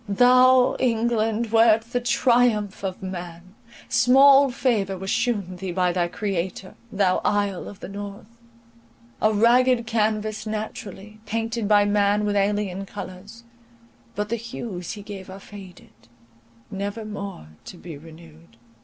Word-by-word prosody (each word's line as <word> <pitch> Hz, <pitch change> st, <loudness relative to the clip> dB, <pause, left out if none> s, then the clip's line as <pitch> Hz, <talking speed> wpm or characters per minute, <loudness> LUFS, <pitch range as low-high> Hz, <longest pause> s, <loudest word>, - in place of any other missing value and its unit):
Thou, 250 Hz, +4 st, +5 dB
England, 230 Hz, -2 st, 0 dB
wert 225 Hz, -1 st, +5 dB
the 245 Hz, -, 0 dB
triumph 240 Hz, -5 st, +1 dB
of 190 Hz, -1 st, -5 dB
man! 180 Hz, -1 st, -8 dB, 0.3 s
Small 275 Hz, +2 st, +6 dB
favour 220 Hz, -7 st, -1 dB
was 190 Hz, +1 st, -4 dB
shewn 200 Hz, -7 st, -1 dB
thee 185 Hz, 0 st, -5 dB
by 180 Hz, 0 st, +1 dB
thy 175 Hz, -1 st, 0 dB
Creator, 190 Hz, 0 st, -4 dB, 0.2 s
thou 195 Hz, -2 st, +1 dB
Isle 205 Hz, -3 st, -1 dB
of 200 Hz, -, -11 dB
the -, -, -7 dB
North; 205 Hz, +3 st, -9 dB, 0.8 s
a 215 Hz, -, +3 dB
ragged 235 Hz, +3 st, +3 dB
canvas 215 Hz, -1 st, -1 dB
naturally, 215 Hz, -1 st, -7 dB
painted 225 Hz, 0 st, -2 dB
by 205 Hz, -1 st, +4 dB
man 205 Hz, 0 st, +2 dB
with 205 Hz, 0 st, -1 dB
alien 200 Hz, -1 st, 0 dB
colours; 205 Hz, +3 st, -10 dB, 0.7 s
but 210 Hz, +2 st, -3 dB
the 235 Hz, -, -1 dB
hues 220 Hz, -6 st, -6 dB
he 205 Hz, -2 st, -9 dB
gave 195 Hz, -3 st, -9 dB
are 190 Hz, +1 st, -9 dB
faded, 195 Hz, -2 st, -13 dB, 0.8 s
never 200 Hz, +3 st, -4 dB
more 200 Hz, -, -7 dB, 0.2 s
to 180 Hz, -, -10 dB
be 170 Hz, -2 st, -9 dB
renewed. 160 Hz, -2 st, -15 dB
205 Hz, 135 wpm, -23 LUFS, 190-230 Hz, 0.8 s, Small